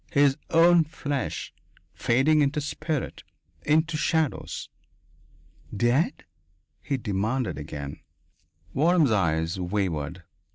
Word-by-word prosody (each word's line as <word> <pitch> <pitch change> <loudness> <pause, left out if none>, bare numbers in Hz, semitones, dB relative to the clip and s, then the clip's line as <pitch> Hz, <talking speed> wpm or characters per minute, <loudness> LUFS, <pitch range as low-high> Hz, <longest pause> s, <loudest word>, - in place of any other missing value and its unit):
His 145 -3 +4
own 170 +1 +6
flesh, 145 -3 -4 0.4
fading 140 +6 +3
into 145 +2 +1
spirit, 150 0 -3 0.4
into 155 +1 +2
shadows.... 155 0 -1 1.1
"Dead?" 120 - +1 0.6
he 140 - -2
demanded 110 +1 -1
again. 75 -1 -7 0.7
Waram's 160 -2 +3
eyes 85 -3 +1
wavered. 90 -3 -2
135 Hz, 85 wpm, -26 LUFS, 95-155 Hz, 1.1 s, own